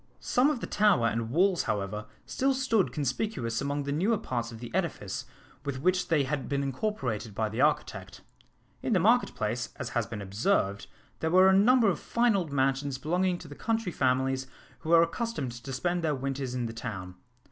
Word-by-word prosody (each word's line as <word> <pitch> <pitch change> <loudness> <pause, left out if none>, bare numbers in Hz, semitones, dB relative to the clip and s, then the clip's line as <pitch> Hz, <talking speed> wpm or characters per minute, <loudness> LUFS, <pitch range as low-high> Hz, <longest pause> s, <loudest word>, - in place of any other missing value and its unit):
Some 255 +4 +2
of 280 -6 -2
the - - -2
tower? 205 - +3
and 115 +1 -2
walls, 180 +6 +3
however, 105 +1 -2 0.2
still 270 +1 +1
stood 230 -7 +1
conspicuous 130 - -2
among 140 +1 -1
the 140 - -3
newer 195 +10 +2
parts 120 - -3
of 115 - -8
the 120 0 -9
edifice - - -2 0.4
with 140 -2 -3
which 180 +4 +1
they 160 -5 +3
had 135 0 -3
been 140 0 0
incorporated 130 - -3
by 110 0 0
the 110 +4 -2
architect. 150 +1 0 0.6
In - - 0
the - - +4
market - - +3
place, - - -2
as - - -5
has - - -1
been 115 -2 -6
observed, 100 - 0 0.3
there 160 - 0
were 185 +2 +6
a - - +5
number 230 +4 +5
of 195 - +1
fine 235 -2 +2
old 175 -6 -1
mansions 135 0 0
belonging 180 +5 0
to 170 - -11
the 145 - -9
country 225 +3 -1
families 130 -1 +1 0.3
who 160 - -7
were 165 0 +7
accustomed 170 - -3
to 120 +3 -8
spend 175 +6 -1
their 155 -2 +1
winters 135 -1 -3
in 125 -1 -1
the 115 - -4
town. 95 -5 -6
140 Hz, 195 wpm, -29 LUFS, 125-185 Hz, 0.6 s, were